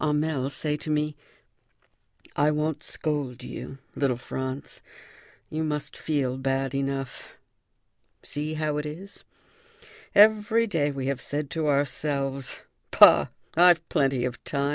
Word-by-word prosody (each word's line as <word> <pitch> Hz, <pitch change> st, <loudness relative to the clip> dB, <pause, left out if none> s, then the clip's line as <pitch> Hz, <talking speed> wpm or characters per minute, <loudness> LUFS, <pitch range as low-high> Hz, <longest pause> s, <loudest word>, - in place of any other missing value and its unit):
Hamel 150 Hz, -3 st, 0 dB
say 150 Hz, +1 st, -2 dB
to 155 Hz, -, -7 dB
me: 150 Hz, 0 st, 0 dB, 1.2 s
"I 145 Hz, +1 st, +3 dB
won't 150 Hz, 0 st, -1 dB
scold 145 Hz, -5 st, -3 dB
you, 135 Hz, -, -7 dB, 0.2 s
little 135 Hz, -4 st, 0 dB
Franz; 130 Hz, +2 st, -6 dB, 0.7 s
you 155 Hz, +1 st, -1 dB
must 150 Hz, -1 st, -2 dB
feel 135 Hz, -4 st, -1 dB
bad 135 Hz, 0 st, -1 dB
enough. 135 Hz, -1 st, -4 dB, 0.9 s
See 150 Hz, +2 st, -3 dB
how 155 Hz, -1 st, -1 dB
it 150 Hz, -, -2 dB
is! 185 Hz, +7 st, -9 dB, 0.9 s
Every 215 Hz, +2 st, +5 dB
day 160 Hz, -9 st, 0 dB
we 135 Hz, -2 st, -4 dB
have 135 Hz, -1 st, -2 dB
said 145 Hz, -1 st, -3 dB
to 160 Hz, -2 st, -1 dB
ourselves: 140 Hz, -1 st, -1 dB, 0.3 s
'Bah! -, -, +7 dB, 0.3 s
I've 170 Hz, -1 st, +5 dB
plenty 135 Hz, -3 st, +1 dB
of 125 Hz, -1 st, -5 dB
time. 140 Hz, -1 st, -1 dB
145 Hz, 125 wpm, -26 LUFS, 135-155 Hz, 1.2 s, Bah